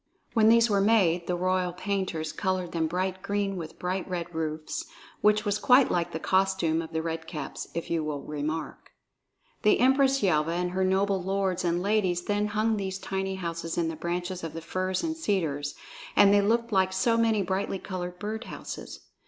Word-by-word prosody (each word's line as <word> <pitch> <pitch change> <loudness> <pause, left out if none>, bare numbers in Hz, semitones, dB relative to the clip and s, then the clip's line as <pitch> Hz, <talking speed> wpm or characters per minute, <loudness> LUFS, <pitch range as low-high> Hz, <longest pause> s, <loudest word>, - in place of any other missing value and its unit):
When 220 -2 +5
these 230 0 +6
were 200 -3 +2
made, 190 -5 +3
the 180 - 0
royal 185 0 0
painters 185 -4 -2
colored 185 -3 -1
them 165 -2 0
bright 185 +2 -2
green 200 0 -1
with 165 -3 -7
bright 185 +1 -3
red 175 -1 -4
roofs, 160 - -3 0.4
which 210 +1 +3
was 205 0 0
quite 250 +4 +5
like 175 0 0
the 160 - -4
costume 190 -3 +1
of 160 -1 -8
the 160 -1 -2
Red 165 0 -4
Caps, 150 -5 -6
if 170 - -4
you 165 -2 +1
will 150 -2 -4
remark. 150 +1 -5 0.7
The 210 - +4
Empress 270 +1 +4
Yelva 165 -3 +2
and 180 +1 -1
her 190 +1 0
noble 190 +1 +2
lords 190 -1 -1
and 175 0 0
ladies 190 -4 +1
then 205 +1 0
hung 215 +1 +1
these 190 -1 -3
tiny 190 0 -3
houses 170 -2 -4
in 165 -1 +1
the 165 - -4
branches 175 +2 -3
of 165 - -5
the 165 - -6
firs 185 +2 -2
and 320 -1 -1
cedars, 165 - -1 0.4
and 200 0 +7
they 205 - +5
looked 230 +3 +1
like 190 -2 +2
so 230 +5 +2
many 225 -3 +2
brightly 190 +1 -1
colored 180 -2 -5
bird 220 +4 -4
houses. - - -8
185 Hz, 190 wpm, -28 LUFS, 170-205 Hz, 0.7 s, and